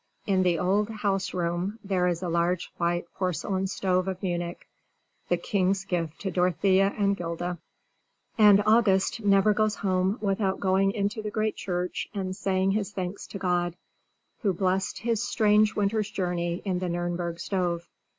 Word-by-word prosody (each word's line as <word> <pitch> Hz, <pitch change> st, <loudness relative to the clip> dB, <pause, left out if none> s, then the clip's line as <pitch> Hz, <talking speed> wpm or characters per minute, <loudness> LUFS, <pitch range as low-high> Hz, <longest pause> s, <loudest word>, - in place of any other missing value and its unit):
In 190 Hz, -2 st, +2 dB
the 180 Hz, -2 st, +2 dB
old 200 Hz, +5 st, +1 dB
house 200 Hz, -3 st, -1 dB
room 175 Hz, +4 st, -2 dB
there 185 Hz, -3 st, +1 dB
is 175 Hz, 0 st, -1 dB
a -, -, -1 dB
large 170 Hz, +1 st, 0 dB
white 175 Hz, 0 st, 0 dB
porcelain 190 Hz, +1 st, -1 dB
stove 185 Hz, -1 st, 0 dB
of 190 Hz, 0 st, -4 dB
Munich, 175 Hz, -1 st, -3 dB, 0.6 s
the 175 Hz, -, +3 dB
king's 190 Hz, +2 st, 0 dB
gift 170 Hz, -4 st, -2 dB
to 195 Hz, -, -2 dB
Dorothea 185 Hz, +2 st, +3 dB
and 200 Hz, -1 st, +2 dB
'Gilda. 175 Hz, 0 st, -4 dB, 0.8 s
And 205 Hz, -2 st, +6 dB
August 215 Hz, -1 st, +3 dB
never 200 Hz, +1 st, +4 dB
goes 215 Hz, 0 st, +1 dB
home 190 Hz, +1 st, 0 dB
without 195 Hz, -2 st, 0 dB
going 195 Hz, 0 st, +2 dB
into 205 Hz, +2 st, -1 dB
the 215 Hz, -, -4 dB
great 215 Hz, 0 st, -1 dB
church 180 Hz, -1 st, -3 dB
and 185 Hz, -2 st, -3 dB
saying 190 Hz, -1 st, +1 dB
his 205 Hz, 0 st, -1 dB
thanks 190 Hz, -1 st, -5 dB
to -, -, -7 dB
God, 175 Hz, -2 st, 0 dB, 0.7 s
who 200 Hz, -6 st, +1 dB
blessed 185 Hz, +1 st, 0 dB
his 230 Hz, -1 st, -1 dB
strange 215 Hz, -3 st, +3 dB
winter's 210 Hz, +1 st, 0 dB
journey 175 Hz, -3 st, -2 dB
in 185 Hz, -2 st, 0 dB
the 185 Hz, -, -2 dB
Nürnberg 175 Hz, 0 st, -2 dB
stove. 175 Hz, -2 st, -2 dB
190 Hz, 160 wpm, -27 LUFS, 175-200 Hz, 0.8 s, And